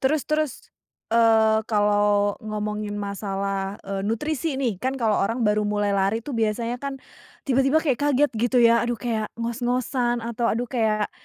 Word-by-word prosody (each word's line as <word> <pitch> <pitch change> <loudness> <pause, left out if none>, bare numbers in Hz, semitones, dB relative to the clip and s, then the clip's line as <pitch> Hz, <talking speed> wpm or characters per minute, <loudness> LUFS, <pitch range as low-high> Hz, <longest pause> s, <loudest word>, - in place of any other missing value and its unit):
Terus 290 +2 +1
terus, 305 -3 0 0.6
eee, 225 -1 +4
kalau 205 -1 +2
ngomongin 210 -1 -4
masalah, 195 -1 -3
eee, 195 0 -3
nutrisi 295 +7 -1
nih. 240 -8 -1
Kan 260 +1 -1
kalau 225 -4 +1
orang 230 +5 0
baru 210 0 +2
mulai 205 -1 0
lari 200 +3 +1
tuh 290 - -6
biasanya 230 +1 -1
kan, 280 -1 -4 0.5
tiba-tiba 270 +2 +2
kayak 270 -6 +1
kaget 290 0 +2
gitu 240 +3 +1
ya, 235 0 +5
aduh 240 0 -1
kayak 220 -1 -2
ngos-ngosan 240 +1 -1
atau 235 0 -2
aduh, 235 +3 0
kayak 215 -4 0
230 Hz, 155 wpm, -24 LUFS, 210-250 Hz, 0.6 s, ya